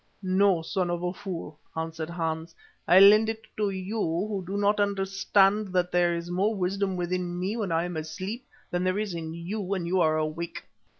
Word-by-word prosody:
"No, 185 -2 +3
son 180 +1 -1
of 175 0 -2
a 180 0 -1
fool!" 175 -6 -7 0.2
answered 160 0 -4
Hans. 165 -1 -3 0.3
"I'll 185 +2 +8
lend 215 +2 +7
it 225 0 -5
to 210 -1 +1
you 195 +3 -4
who 190 +4 -1
do 195 +2 -2
not 205 +1 +2
understand 195 +1 +2
that 180 -1 +1
there 175 -1 +3
is 170 +1 -5
more 200 +5 +1
wisdom 190 0 -1
within 175 0 -2
me 190 +4 -1
when 210 -6 -2
I 165 0 +2
am 175 -1 -4
asleep 185 +10 -5 0.2
than 175 0 0
there 185 +1 +1
is 210 -3 -2
in 165 -1 -5
you 180 +6 -4
when 190 -2 -2
you 180 +2 +1
are 155 -1 +3
awake." 155 +2 -3
185 Hz, 195 wpm, -27 LUFS, 170-200 Hz, 0.3 s, I'll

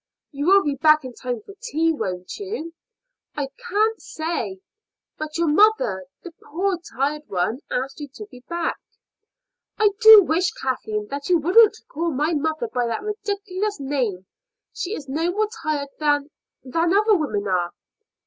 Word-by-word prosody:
"You 285 +1 -3
will 395 +1 +6
be 290 - 0
back 305 -1 +5
in 255 - -7
time 245 -2 -4
for - - -11
tea, 330 -9 +1
won't 185 - -4
you?" 385 -5 -5 0.6
"Can't 405 +10 -1
say." 335 +4 -4 0.6
"But 310 0 -4
your 335 - +2
mother, 300 - +3 0.2
the 350 - -8
poor 365 +3 -1
tired 290 +3 -1
one, 190 +6 -1
asked 270 +4 -3
you 290 - -6
to 425 - -8
be 250 - -12
back." 340 -1 -1 1.0
"I 430 -1 +5
do 440 -3 +10
wish, 350 +2 +1
Kathleen, 215 -5 -3
that 280 +3 -5
you 355 - +5
wouldn't 420 +7 +5
call 335 +3 -2
mother 305 -2 -1
by 245 +1 -1
that 230 - -3
ridiculous 410 -2 -3
name. 250 -10 -2 0.5
She 390 +5 -3
is 285 - -8
no 320 +6 -1
more 420 +4 0
tired 295 -3 -2
than 290 -1 +1 0.3
than 335 +7 +1
other 425 +1 +4
women 215 - -1
are." 180 -2 +1
310 Hz, 155 wpm, -23 LUFS, 270-385 Hz, 1.0 s, do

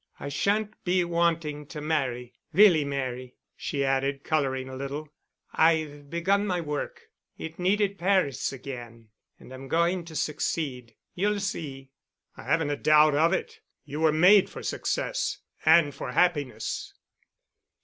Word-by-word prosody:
I 140 - -5
shan't 205 +9 -1
be 180 0 +2
wanting 165 -4 0
to 150 - -7
marry—really 150 +5 +2
marry——" 130 -3 -4 0.2
she 140 -2 -2
added, 135 +1 0
coloring 135 -4 0
a 130 - -7
little. 140 +3 -5 0.5
"I've 155 -3 +1
begun 195 +5 +1
my 180 -2 0
work. 150 -3 -4 0.3
It 160 +1 -8
needed 200 +2 +1
Paris 185 -7 +1
again. 120 -4 -9 0.3
And 130 - -13
I'm 130 +1 -9
going 170 +4 +1
to 160 -1 -10
succeed. 140 -6 -3 0.2
You'll 205 +3 0
see." 140 -9 -5 0.4
"I - - -11
haven't 150 +2 +1
a 145 - -1
doubt 155 0 +5
of 160 +4 +3
it. 190 - -3 0.3
You 145 +1 -6
were 160 -1 +4
made 180 +6 +6
for - - -9
success—and 170 - +1
for 125 - -6
happiness." 145 -11 0
150 Hz, 135 wpm, -27 LUFS, 135-170 Hz, 0.5 s, made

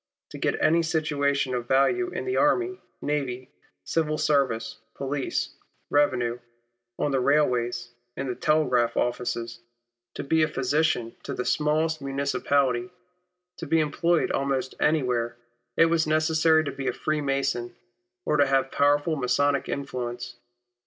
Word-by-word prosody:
To - - -8
get - - 0
any 165 +2 +4
situation 145 -4 0
of 120 -1 -3
value 250 - +2
in - - -5
the 385 - -1
army, 365 +5 +2 0.2
navy, 130 -4 -3 0.3
civil 155 -2 0
service, 130 -7 0 0.2
police, 140 0 -2 0.4
revenue, 125 -5 +2 0.6
on 145 - 0
the 135 - +1
railways, 120 -4 +1 0.3
in 140 - -3
the 125 - -2
telegraph 125 -6 +1
offices, 120 -1 -2 0.6
to - - -4
be 160 +3 +2
a 155 - +4
physician 140 -4 0
to - - -5
the 125 - -3
smallest 155 +1 +1
municipality, 140 -1 0 0.7
to 165 - -6
be 165 +2 +3
employed 165 +3 +1
almost 135 -2 -1
anywhere, 125 -6 +1 0.4
it 165 - +7
was 165 -1 +1
necessary 160 +1 +3
to 140 - -3
be 135 0 -5
a 125 - +1
Freemason, 135 -5 -1 0.5
or 150 - +1
to 145 -1 +4
have 135 0 +1
powerful 145 +3 +2
Masonic 140 +1 +1
influence. 120 -3 -4
140 Hz, 135 wpm, -26 LUFS, 125-155 Hz, 0.7 s, it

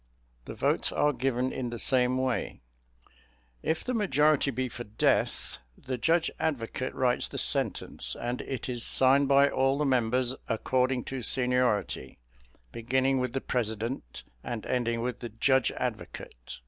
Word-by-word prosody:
The - - -7
votes - - +1
are 150 0 +2
given 130 0 -1
in 125 -2 -3
the 120 - -5
same 125 +1 +3
way; 130 -1 -2 1.0
if 160 - -1
the 255 - -2
majority 155 - +3
be 130 0 -2
for 120 0 -7
death, 105 - 0 0.2
the 130 - -4
judge 165 +5 +2
advocate 130 -3 -2
writes 125 -1 +1
the - - -7
sentence, - - 0
and 120 +1 -3
it 130 -4 -5
is 120 -2 -3
signed 135 +2 +4
by 140 +1 +5
all 135 0 +1
the 150 - 0
members, 125 -1 +1
according 125 +2 +1
to 135 -1 -5
seniority, 125 -3 +1 0.5
beginning 130 - +1
with 125 -1 -2
the 135 - -2
president 110 - -3 0.2
and 120 -3 -5
ending 120 -2 0
with 125 +1 -3
the 120 - -6
judge 130 +4 +2
advocate. - - -6
130 Hz, 145 wpm, -28 LUFS, 120-135 Hz, 1.0 s, by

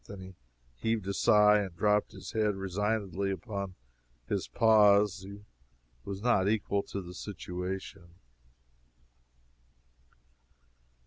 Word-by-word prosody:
Then 100 - -9
he 95 0 -11 0.4
heaved 110 - -2
a 100 - -1
sigh 105 0 +5
and 95 -4 -4
dropped 105 +3 +2
his - - -9
head 105 -2 +1
resignedly 100 0 -2
upon 100 -1 -4 0.5
his - - -2
paws. 105 -2 +4
He 100 +2 -10 0.6
was 100 - -6
not 100 -5 +3
equal 100 -2 0
to 100 -1 -6
the 90 0 -9
situation. 90 -2 -6
100 Hz, 110 wpm, -30 LUFS, 95-105 Hz, 0.6 s, sigh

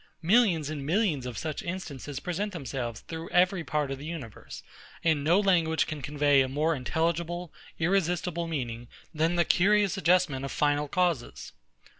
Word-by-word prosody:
Millions 180 -5 +3
and 145 -3 -5
millions 160 - 0
of 120 -4 -6
such 155 +3 -3
instances 150 -6 -5
present 195 +5 -3
themselves 130 -7 -4
through 165 0 -7
every 180 0 +3
part 150 -3 -1
of 135 - -4
the 145 - -8
universe; 145 -10 -8 0.4
and 155 -4 +2
no 170 +6 +4
language 170 -5 +2
can 155 -2 -6
convey 145 -1 +3
a 130 - 0
more 155 +5 +1
intelligible 170 +4 -2 0.2
irresistible 175 -1 0
meaning, 120 -7 -4 0.3
than 160 +2 +1
the 170 -1 +3
curious 205 +3 +3
adjustment 175 -7 +2
of 135 - -4
final 145 0 +1
causes. 170 -5 -1
160 Hz, 155 wpm, -28 LUFS, 145-180 Hz, 0.4 s, no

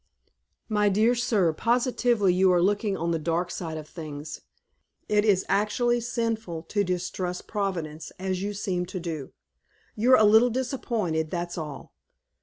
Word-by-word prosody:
"My 210 -2 +2
dear 215 +5 +3
sir, 210 -8 +2
positively 240 - +2
you 185 +1 +4
are 180 - +4
looking 200 +2 +1
on 170 +1 -1
the 165 - 0
dark 170 +2 -1
side 160 -3 -5
of 155 -1 -8
things. 150 -2 -8 0.7
It 210 -1 +3
is 200 -3 +3
actually 240 +4 +1
sinful 225 -8 -2
to 205 -1 +1
distrust 180 0 -3
Providence 170 -7 -3
as 185 0 -2
you 205 +1 -3
seem 180 -3 -2
to 185 - -5
do. 160 -6 -5 0.6
You're 245 +4 +5
a 215 - +5
little 220 +4 +6
disappointed, 230 - -2
that's 175 0 -3
all. 150 -4 -7
190 Hz, 150 wpm, -26 LUFS, 170-220 Hz, 0.7 s, little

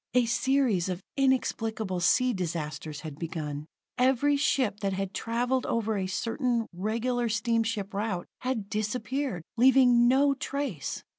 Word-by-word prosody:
A 250 -1 +5
series 240 -6 +1
of 180 0 -4
inexplicable 225 -7 0
sea 250 +8 +3
disasters 155 -4 -4
had 155 -2 -8
begun. 155 -3 -4 0.3
Every 265 +3 +3
ship 260 -7 +1
that 195 -2 -1
had 195 0 -3
traveled 245 +4 -1
over 220 -1 0
a 190 -2 -1
certain, 235 +4 -1
regular 230 +6 -1
steamship 225 -2 0
route, 200 -3 -2
had 250 -6 -2
disappeared, 215 - -2
leaving 245 -1 +6
no 275 +3 +4
trace. 275 - -4
225 Hz, 130 wpm, -28 LUFS, 190-255 Hz, 0.3 s, leaving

